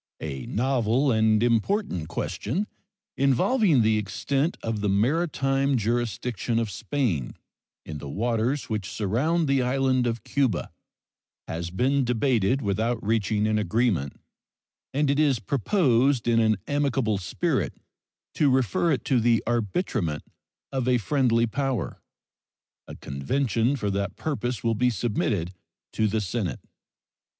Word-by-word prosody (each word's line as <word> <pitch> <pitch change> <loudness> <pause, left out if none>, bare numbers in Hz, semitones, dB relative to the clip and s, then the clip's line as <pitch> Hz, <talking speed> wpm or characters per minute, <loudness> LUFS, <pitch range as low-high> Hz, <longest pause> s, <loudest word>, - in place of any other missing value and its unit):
A 70 -5 -5
novel 130 +2 +1
and 110 -1 +3
important 115 - 0
question, 150 - -2 0.5
involving 140 - +3
the 110 0 +3
extent 135 - -1
of 110 -2 -2
the 105 - 0
maritime 135 - +1
jurisdiction 115 0 -1
of 115 -3 -1
Spain 95 - -2 0.5
in 75 -2 -6
the 70 - -7
waters 120 - -1
which 105 -5 -3
surround 145 - 0
the 135 -1 +2
island 130 0 +1
of 115 -2 -3
Cuba, 130 -10 0 0.8
has 85 +1 -4
been 130 +9 +1
debated 125 0 +1
without 110 +5 0
reaching 105 -1 +1
an 110 0 +1
agreement, 105 - 0 0.7
and 145 +2 +1
it 140 - +1
is 145 -4 +3
proposed 135 - +2
in 115 -1 +4
an 110 -2 +3
amicable 135 -7 0
spirit 90 - -1 0.6
to 145 - +3
refer 130 - +2
it - - -1
to 130 -3 +2
the 115 0 +2
arbitrament 110 - -1 0.5
of 130 -2 -2
a 125 -1 +4
friendly 115 +1 +2
power. 125 - -2 0.9
A - - -8
convention 115 - -1
for 105 -6 -2
that 100 -1 -2
purpose 125 -6 -3
will 115 -1 +2
be 125 +3 +2
submitted 105 -5 -1 0.4
to 110 - +1
the 110 +1 0
Senate. 95 - -3
120 Hz, 130 wpm, -26 LUFS, 105-135 Hz, 0.9 s, in